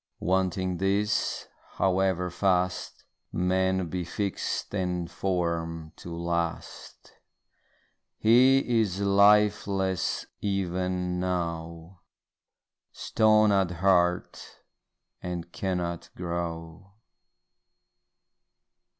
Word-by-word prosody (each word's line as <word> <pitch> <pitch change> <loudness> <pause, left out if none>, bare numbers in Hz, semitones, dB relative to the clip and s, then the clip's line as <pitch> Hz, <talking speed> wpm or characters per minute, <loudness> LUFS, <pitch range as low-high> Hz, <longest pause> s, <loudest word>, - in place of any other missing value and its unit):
Wanting 95 0 0
these, 100 +3 0 0.3
however 95 -1 +1
fast 90 -1 0 0.3
Man 95 0 +1
be 90 +2 -3
fix'd 100 +4 -3
and 90 -3 -2
form'd 85 -3 -2
to 85 - -9
last, 85 0 -4 1.0
He 125 +1 +4
is 100 -3 -2
lifeless 100 -2 +3 0.2
even 90 -2 -1
now, 85 -1 -4 0.9
Stone 110 -1 +3
at 95 -3 +2
heart, 90 0 0 0.6
and 85 -1 -5
cannot 90 -3 -3
grow. 85 +1 -5
90 Hz, 70 wpm, -27 LUFS, 85-95 Hz, 1.0 s, He